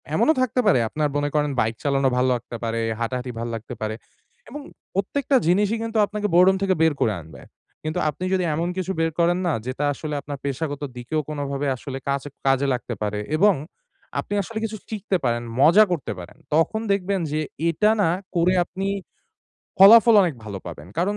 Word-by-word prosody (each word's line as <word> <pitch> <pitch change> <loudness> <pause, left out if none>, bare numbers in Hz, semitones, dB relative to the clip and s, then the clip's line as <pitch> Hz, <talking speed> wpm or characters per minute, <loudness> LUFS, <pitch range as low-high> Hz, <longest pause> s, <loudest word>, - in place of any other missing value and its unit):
এমনও 315 - +4
থাকতে 255 -1 0
পারে 195 -11 +5
আপনার 150 +2 -1
মনে 145 0 0
করেন 150 -1 +1
বাইক 110 +1 +1
চালানো 140 -2 +2
ভালো 130 +1 +2
লাগতে 120 0 -7
পারে, 115 0 -1 0.2
হাঁটাহাঁটি 125 +2 -3
ভাল 115 - -3
লাগতে 115 +2 -7
পারে। 110 0 -2 0.5
এবং 295 - -7 0.3
প্রত্যেকটা 265 +9 0
জিনিসই 205 +5 +2
কিন্তু 230 0 -3
আপনাকে 210 +1 -3
boredom 185 +2 +6
থেকে 190 -1 +3
বের 160 -2 +4
করে 110 - +2
আনবে। 80 0 -13 0.4
কিন্তু 155 0 -2
আপনি 150 +5 -6
যদি 185 -1 +2
এমন 165 +2 -1
কিছু 185 0 -2
বের 165 0 +1
করেন 175 +1 +3
না 165 - +1
যেটা 130 +3 -2
আসলে 150 +1 -6
আপনার 145 -1 -6
পেশাগত 145 +1 -3 0.2
দিকেও 125 +6 -2
কোনোভাবে 145 -1 -3
আসলে 130 +2 -7
কাচে 140 +1 -1 0.2
কাজে 135 +1 +3
লাগতে 120 -1 -4
পারে 105 0 -2 0.2
এবং 205 +3 +5 0.7
আপনি - - -4
আসলে 220 +3 -5
কিছু 215 0 -5
শিখতে 210 -3 -1
পারেন, 120 -1 0 0.2
মজা 170 +9 +7
করতে 170 -5 -2
পারেন। 90 0 -11 0.2
তখন 190 +8 +2
দেখবেন 200 0 0
যে 155 - 0 0.3
এটা 190 +6 +2
না 185 - +3 0.3
করে 175 +2 +3
আপনি 190 +2 -4 0.9
ফলাফল 225 +4 +9
অনেক 175 -5 0
ভালো 100 -2 -6
পাবেন। 80 -3 -8
কারণ 200 +4 +1
155 Hz, 185 wpm, -23 LUFS, 130-195 Hz, 0.9 s, ফলাফল